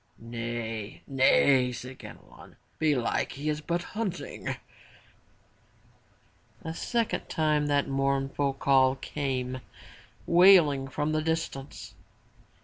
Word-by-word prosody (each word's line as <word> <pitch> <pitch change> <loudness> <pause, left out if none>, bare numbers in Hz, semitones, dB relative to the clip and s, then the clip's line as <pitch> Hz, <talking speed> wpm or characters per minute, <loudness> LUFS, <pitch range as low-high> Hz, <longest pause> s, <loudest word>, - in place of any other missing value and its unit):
'* - - -39
"Nay! 115 -2 -5
nay!" 130 -1 +4
said 125 +1 -8
Ganelon, - - -13
'* - - -39
belike 145 -6 0
he 145 +2 -3
is 150 0 -2
but 170 +2 -2
hunting/' 210 -4 -4 2.1
A 160 -1 -4
second 230 +6 -2
time 150 -3 +1
that 145 -1 +1
mournful 135 0 0
call 135 -1 +3
came 130 -3 -3 0.6
wailing 170 -6 +6
from 150 +3 -2
the 155 0 0
distance. 160 -4 -4
140 Hz, 105 wpm, -28 LUFS, 130-155 Hz, 2.1 s, wailing